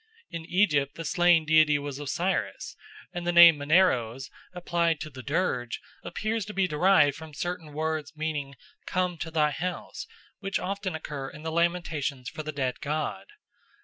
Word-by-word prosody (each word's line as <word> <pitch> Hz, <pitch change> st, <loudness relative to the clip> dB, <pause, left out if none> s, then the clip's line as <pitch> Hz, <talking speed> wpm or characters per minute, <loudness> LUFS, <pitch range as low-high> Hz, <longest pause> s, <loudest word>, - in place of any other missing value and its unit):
In 165 Hz, -2 st, -6 dB
Egypt 150 Hz, -8 st, +2 dB
the 165 Hz, -, -6 dB
slain 175 Hz, 0 st, +4 dB
deity 155 Hz, -1 st, +5 dB
was 145 Hz, -1 st, -5 dB
Osiris, 170 Hz, +6 st, -2 dB, 0.4 s
and 175 Hz, -1 st, -4 dB
the -, -, +3 dB
name 170 Hz, -3 st, +9 dB
Maneros, 135 Hz, -6 st, +2 dB, 0.2 s
applied 170 Hz, -2 st, 0 dB
to 155 Hz, -, -6 dB
the 130 Hz, -1 st, -9 dB
dirge, 125 Hz, -6 st, -1 dB, 0.2 s
appears 220 Hz, 0 st, -2 dB
to 210 Hz, -, -8 dB
be 195 Hz, -1 st, +2 dB
derived 150 Hz, -3 st, +4 dB
from 160 Hz, -2 st, -10 dB
certain 175 Hz, -2 st, -4 dB
words 155 Hz, 0 st, -3 dB
meaning 150 Hz, -3 st, -3 dB, 0.3 s
"Come 180 Hz, -2 st, -1 dB
to 165 Hz, -, -4 dB
thy 155 Hz, -2 st, +2 dB
house," 180 Hz, +5 st, -5 dB, 0.3 s
which 195 Hz, -1 st, -2 dB
often 195 Hz, -2 st, -3 dB
occur 145 Hz, -3 st, -5 dB
in 150 Hz, -, -12 dB
the 160 Hz, -, -3 dB
lamentations 160 Hz, -6 st, -1 dB
for -, -, -6 dB
the 155 Hz, 0 st, -5 dB
dead 130 Hz, -4 st, -2 dB
god. 150 Hz, +1 st, -3 dB
160 Hz, 160 wpm, -27 LUFS, 145-175 Hz, 0.4 s, name